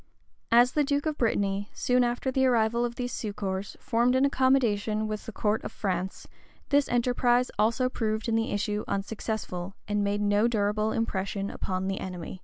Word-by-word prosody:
As 240 +2 +6
the 300 - +2
duke 285 +1 0
of 310 -1 -2
Brittany, 200 -3 0
soon 250 0 +2
after 245 +2 -1
the 265 0 +3
arrival 235 -1 +2
of 240 0 -2
these 245 -1 -3
succors, 200 -2 -4
formed 245 -1 +2
an 260 +1 +4
accommodation 230 -6 +2
with 215 0 -5
the - - -4
court 210 0 0
of - - -5
France, 190 -3 -3 0.4
this 285 0 +3
enterprise 245 0 +2
also 235 +4 +2
proved 220 -3 -2
in 230 - 0
the 225 +3 +1
issue 210 +1 -1
unsuccessful, 195 -2 -4
and 205 0 0
made 205 +1 0
no 205 +2 +3
durable 215 -1 0
impression 200 -2 -2
upon 185 0 -3
the 195 0 -2
enemy. 180 -1 -6
220 Hz, 175 wpm, -28 LUFS, 205-245 Hz, 0.4 s, As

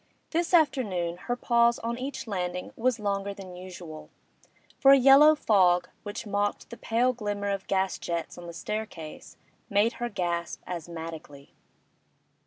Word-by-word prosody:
This 335 +1 0
afternoon 225 - +2
her 245 - +2
pause 235 -1 +3
on 235 +1 -3
each 265 +1 -5
landing 180 -4 -4
was 250 +1 +1
longer 200 -1 -2
than 185 -2 -10
usual, 175 -4 -9 0.7
for 270 - +6
a - - +8
yellow 275 +4 +7
fog, 185 -9 +3
which 205 +2 -6
mocked 205 0 -2
the 235 - -8
pale 245 +3 +1
glimmer 205 -3 -3
of 195 -1 -4
gas 190 -1 0
jets 170 -1 -4
on 175 0 -10
the - - -6
staircase, 175 -4 -6 0.3
made 210 +3 +3
her 240 - -1
gasp 175 -4 -3
asthmatically. 160 -4 -8
200 Hz, 145 wpm, -27 LUFS, 175-235 Hz, 0.7 s, a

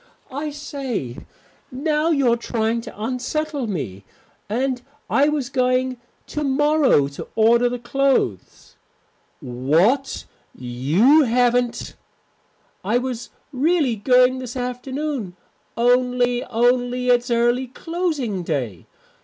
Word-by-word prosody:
"I 290 +3 -3
say, 270 - -5 0.5
now 300 +4 0
you're 275 -7 +3
trying 230 -1 -1
to 225 -3 -11
unsettle 260 +3 -2
me. 105 - -4 0.5
And 250 +3 -1 0.3
I 285 +2 +4
was 290 -4 -2
going 255 0 +1 0.3
to 300 - -4
morrow 290 - +3
to 140 - -8
order 235 +2 +4
the 245 - -3
clothes." 245 - -1 0.6
"What! 165 - +1 0.3
You 150 - +3
haven't 245 0 +1 0.4
" - - -40
"I - - +5
was 245 -2 -4 0.2
really 290 -2 +2
going 250 +4 +3
this 255 -1 -7
afternoon, 250 -3 -4 0.4
only 245 0 +2
only 245 +1 +1
it's 245 0 +3
early 240 +2 +2
closing 295 - -3
day. 130 - -3
250 Hz, 105 wpm, -22 LUFS, 230-275 Hz, 0.6 s, I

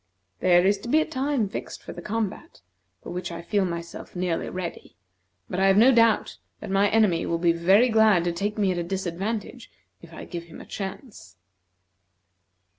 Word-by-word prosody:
There 175 0 +4
is 200 +1 +3
to 235 - -8
be 310 - +4
a 315 - +1
time 265 -4 -1
fixed 195 - -7
for - - -8
the - - -9
combat, 215 - -4 0.4
for - - -8
which 180 0 -4
I 170 0 -7
feel 200 +2 +1
myself 170 0 -7
nearly 180 -2 -2
ready, 180 -2 -7 0.5
but 180 - -3
I 195 - +4
have 195 0 +4
no 240 +5 +7
doubt 230 -3 +2 0.2
that - - -7
my 200 +1 +3
enemy 205 -6 +2
will 170 - 0
be 170 0 +3
very 190 +8 +4
glad 220 -6 +4
to 175 - 0
take 205 +5 -3
me 200 -3 +2
at 175 - -2
a - - -1
disadvantage 190 +4 -4 0.3
if - - -14
I - - -9
give 170 -2 -7
him 170 - -12
a - - -11
chance." 195 - -8
195 Hz, 190 wpm, -25 LUFS, 175-220 Hz, 0.5 s, no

